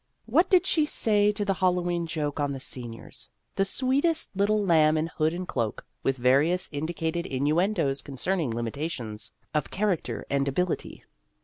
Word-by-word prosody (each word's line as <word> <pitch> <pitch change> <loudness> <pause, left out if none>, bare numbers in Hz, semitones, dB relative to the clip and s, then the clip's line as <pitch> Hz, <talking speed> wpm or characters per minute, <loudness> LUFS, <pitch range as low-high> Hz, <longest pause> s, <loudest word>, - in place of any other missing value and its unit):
What 360 - +3
did 370 -1 +5
she 310 -5 +2
say 210 -6 +3
to 205 0 -2
the 195 - +2
Hallowe'en 175 -2 0
joke 150 -2 -2
on 145 -1 0
the 135 - -5
seniors 120 -3 -7 0.3
the 195 - +2
sweetest 275 - +1
little 205 +1 +2
lamb 155 -3 +4
in 155 - +1
hood 160 -1 0
and 180 +2 -5
cloak, 115 -8 -2 0.2
with 135 0 0
various 145 +9 +3
indi 160 +4 -3
cated 165 +2 -2
innuendos 150 +2 +1
concerning 155 +3 -2
limitations 115 -1 -3 0.2
of 150 -2 0
character 195 -4 -1
and 140 0 0
ability 180 +6 -2
165 Hz, 155 wpm, -27 LUFS, 140-195 Hz, 0.3 s, did